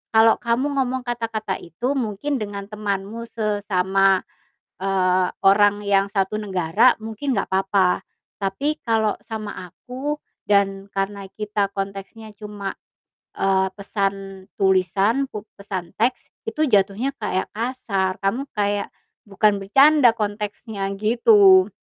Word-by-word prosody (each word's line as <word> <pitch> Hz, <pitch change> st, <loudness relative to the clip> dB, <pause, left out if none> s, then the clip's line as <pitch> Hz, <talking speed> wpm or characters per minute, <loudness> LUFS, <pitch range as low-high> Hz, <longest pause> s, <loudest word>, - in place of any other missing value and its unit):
"kalau 225 Hz, 0 st, +6 dB
kamu 260 Hz, +4 st, 0 dB
ngomong 260 Hz, -1 st, -1 dB
kata-kata 225 Hz, -4 st, -3 dB
itu 235 Hz, -, -3 dB
mungkin 260 Hz, +2 st, -2 dB
dengan 200 Hz, -2 st, -5 dB
temanmu 210 Hz, +2 st, -4 dB
sesama," 195 Hz, -3 st, +2 dB, 0.6 s
eee, 185 Hz, -1 st, +2 dB, 0.2 s
"orang 205 Hz, +1 st, +4 dB
yang 200 Hz, -1 st, +2 dB
satu 195 Hz, 0 st, 0 dB
negara 195 Hz, +3 st, +3 dB
mungkin 225 Hz, +5 st, -3 dB
enggak -, -, -1 dB
apa-apa, 190 Hz, -1 st, +2 dB, 0.4 s
tapi 210 Hz, +10 st, -1 dB
kalau 220 Hz, -2 st, +2 dB, 0.2 s
sama 215 Hz, -2 st, -5 dB, 0.2 s
aku 260 Hz, -, -5 dB, 0.3 s
dan 195 Hz, -1 st, +2 dB
karena 195 Hz, 0 st, -3 dB
kita 210 Hz, -1 st, -1 dB
konteksnya 195 Hz, +3 st, -6 dB
cuma" 205 Hz, -2 st, -6 dB, 0.6 s
eee, 190 Hz, 0 st, +2 dB
"pesan 195 Hz, -1 st, -3 dB, 0.2 s
tulisan, 195 Hz, +7 st, +2 dB
pu 210 Hz, 0 st, -7 dB
pesan 190 Hz, -4 st, -6 dB
teks, 240 Hz, +4 st, 0 dB, 0.2 s
itu 310 Hz, -7 st, 0 dB
jatuhnya 210 Hz, +4 st, +2 dB
kayak 185 Hz, -, -1 dB
kasar. 215 Hz, -5 st, -1 dB
Kamu 230 Hz, +8 st, 0 dB
kayak 205 Hz, -1 st, 0 dB, 0.4 s
bukan 205 Hz, +1 st, +2 dB
bercanda 275 Hz, +5 st, +6 dB
konteksnya." 210 Hz, -1 st, -4 dB
Gitu, 375 Hz, -, +6 dB
205 Hz, 115 wpm, -22 LUFS, 195-230 Hz, 0.6 s, kalau